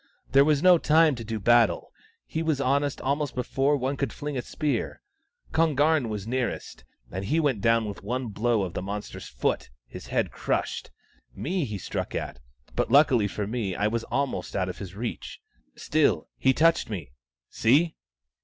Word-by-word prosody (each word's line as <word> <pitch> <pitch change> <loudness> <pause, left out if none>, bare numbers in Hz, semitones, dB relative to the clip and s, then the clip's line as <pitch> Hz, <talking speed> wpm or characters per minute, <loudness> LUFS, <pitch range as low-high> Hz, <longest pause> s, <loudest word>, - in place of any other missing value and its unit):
There 135 +1 +7
was 145 -1 +2
no 180 -2 +7
time 160 0 +4
to 120 -3 -6
do 110 0 -4
battle: 120 0 +3 0.3
he 160 - -3
was 160 -3 0
on 140 +1 +2
us 145 -2 -3
almost 140 +1 -1
before 135 +3 +1
one 135 +1 -2
could 135 -5 -1
fling 145 0 -5
a 125 - -1
spear. 150 +3 -2 0.5
Kon 160 -2 +2
garn 150 -3 +3
was 105 -2 -4
nearest, 125 - -3 0.3
and 95 +2 -4
he 155 +10 +1
went 140 -10 +1
down 115 +1 +3
with 100 - -7
one 125 +3 -3
blow 110 +1 +1
of 90 -3 -4
the - - -3
monster's 100 +2 -6
foot, 60 - -2 0.2
his - - -10
head - - 0
crushed. - - -2 0.5
Me 175 0 -1
he 105 -4 -4
struck 95 - -4
at, - - -4 0.4
but - - 0
luckily 130 -5 +5
for 105 +1 -3
me 105 -4 -2
I 105 - 0
was 115 +2 0
almost 140 -1 -2
out 95 -2 0
of 90 - -7
his 95 -2 -8
reach. 115 +3 -5 0.4
Still, 155 -1 +1
he 130 - +4
touched 165 +2 +3
me 90 - -6 0.2
— 65 -2 -70
see 150 +9 +3
125 Hz, 185 wpm, -26 LUFS, 105-145 Hz, 0.5 s, There